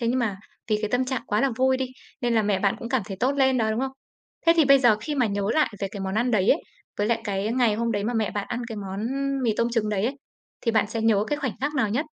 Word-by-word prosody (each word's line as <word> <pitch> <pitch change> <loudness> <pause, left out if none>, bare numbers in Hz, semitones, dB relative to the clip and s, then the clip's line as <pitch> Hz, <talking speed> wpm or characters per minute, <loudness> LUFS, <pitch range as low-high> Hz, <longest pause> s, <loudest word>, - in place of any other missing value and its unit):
Thế 235 - -1
nhưng 255 - +1
mà 220 -6 -1 0.3
vì 210 - +3
cái 215 - 0
tâm 250 +1 +2
trạng 255 -1 -2
quá 210 - +1
là 275 0 +2
vui 260 +1 +3
đi, 260 0 -2 0.3
nên 240 -1 +1
là 220 - +3
mẹ 205 -2 +1
bạn 200 0 +1
cũng 230 - -6
cảm 255 -2 +1
thấy 195 -3 -6
tốt 260 +3 +2
lên 265 -2 +3
đó, 220 -1 +1
đúng 220 - -1
không? 265 0 -2 0.5
Thế 330 - +8
thì 320 - +6
bây 275 0 +7
giờ 240 -5 +5
khi 295 +6 -3
mà 255 -4 +2
nhớ 200 -1 -2
lại 310 -5 +3
về 195 - -1
cái 200 - -6
món 190 0 -3
ăn 240 +3 +1
đấy 205 -4 +2
ấy, 310 - +3 0.4
với 205 - +1
lại 230 0 +1
cái 200 +1 -1
ngày 240 -4 +3
hôm 230 +1 -1
đấy 205 -1 -1
mà 240 +3 -1
mẹ 220 -3 0
bạn 205 -1 -3
ăn 240 - -3
cái 225 - -6
món 200 +1 -4 0.4
mì 225 -3 +1
tôm 235 0 +1
trứng 225 -3 0
đấy 205 -1 0
ấy, 265 +4 -1 0.4
thì 230 - +1
bạn 220 -1 +3
sẽ 225 +1 -3
nhớ 215 -2 +3
cái 295 - -1
khoảnh 265 -6 -2
khắc 295 +2 -1
nào 255 -7 +1
nhất? 255 +9 -1
230 Hz, 310 wpm, -25 LUFS, 210-260 Hz, 0.5 s, Thế